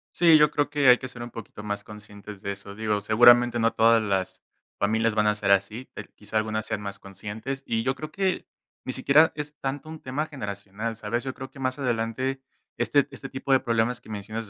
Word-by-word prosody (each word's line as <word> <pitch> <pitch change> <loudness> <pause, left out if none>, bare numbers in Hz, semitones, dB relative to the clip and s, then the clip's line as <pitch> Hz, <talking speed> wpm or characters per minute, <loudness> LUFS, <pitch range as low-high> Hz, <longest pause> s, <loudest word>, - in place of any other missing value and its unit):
Sí, 165 -2 +7
yo 150 -1 +5
creo 145 -1 0
que 145 -2 +1
hay 125 0 +9
que 130 - -7
ser 120 -1 -11
un 120 - -6
poquito 110 -2 -9
más 100 -1 -4
conscientes 105 -1 -11
de 100 - -3
eso, 100 0 -10
digo, 105 -1 0
seguramente 120 +3 +6
no 115 0 +3
todas 115 0 +5
las 95 -3 -2 0.4
familias 110 +2 +1
van 105 0 +2
a 105 - +3
ser 100 -2 0
así, 100 +6 +1
per - - -9
quizá 105 +1 -4
algunas 110 0 -1
sean 110 -1 -3
más 100 -1 -6
conscientes, 105 +8 -6
y 115 -1 -1
yo 130 +2 +1
creo 155 +2 -7
que, 190 -2 -1 0.4
ni 130 - -3
siquiera 145 +5 +5
es 150 -1 -6
tanto 135 +3 -4
un 160 0 -9
tema 130 +4 -2
generacional, 105 -5 -5
¿sabes?, 115 +2 -3
yo 130 -1 -4
creo 130 0 -8
que 135 - -14
más 130 -1 -1
adelante 130 +1 -1 0.4
este 145 -2 +2
este 135 - -8
tipo 135 +1 -4
de 135 - +6
problemas 115 -1 0
que - - -17
mencionas 110 +1 -6
115 Hz, 220 wpm, -26 LUFS, 105-135 Hz, 0.4 s, hay